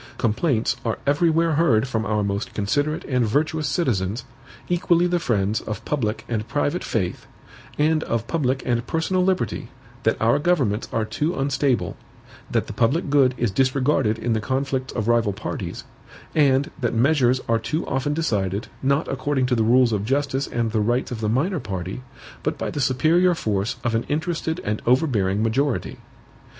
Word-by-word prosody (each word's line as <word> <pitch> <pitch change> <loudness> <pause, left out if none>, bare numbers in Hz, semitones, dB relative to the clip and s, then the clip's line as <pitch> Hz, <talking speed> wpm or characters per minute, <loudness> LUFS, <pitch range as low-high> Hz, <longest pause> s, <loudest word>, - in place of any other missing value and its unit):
Complaints 120 +1 +1
are 115 -2 -1
everywhere 165 +3 +3
heard 135 -7 +3
from 110 -3 -2
our 105 -1 +1
most 100 +1 -3
considerate 145 +9 0
and 125 -3 +1
virtuous 150 +6 0
citizens, 120 - -1 0.4
equally 175 0 +2
the 175 0 +1
friends 105 - 0
of 105 -1 -6
public 115 -7 -2
and 110 -2 -2
private 145 +4 -1
faith, 95 -6 -2 0.5
and 155 +1 +2
of 115 -1 -1
public 135 -3 -1
and 120 -1 0
personal 180 +3 0
liberty, 185 0 0 0.3
that - - +1
our 115 +5 +3
governments 140 -11 +1
are 110 -1 0
too 155 +10 -1
unstable, 135 -1 0 0.5
that - - 0
the - - -7
public 140 +6 +1
good 135 -3 +4
is 120 -3 0
disregarded 130 -1 +2
in 115 +1 -1
the 110 - 0
conflicts 130 +2 -2
of 110 -2 -3
rival 115 -3 +2
parties, 110 - -5 0.5
and 140 -2 +3
that 120 -1 0
measures 130 0 +3
are 115 -1 +2
too 155 +8 -2
often 135 +2 -1
decided, 105 - -1
not 140 +3 +1
according 135 0 0
to 125 - 0
the 115 - +2
rules 120 +1 +4
of 100 -2 0
justice 135 +3 0
and 115 -2 -1
the 110 -1 +1
rights 120 +5 0
of 115 -2 -4
the 105 - 0
minor 155 - +1
party, 95 -2 -5 0.4
but - - -2
by - - -3
the 145 - -3
superior 160 +7 +3
force 105 -6 -1
of 120 - 0
an 115 - +2
interested 160 +2 -1
and 105 +1 -2
overbearing 110 - +2
majority. 130 +4 0
130 Hz, 170 wpm, -23 LUFS, 110-150 Hz, 0.5 s, good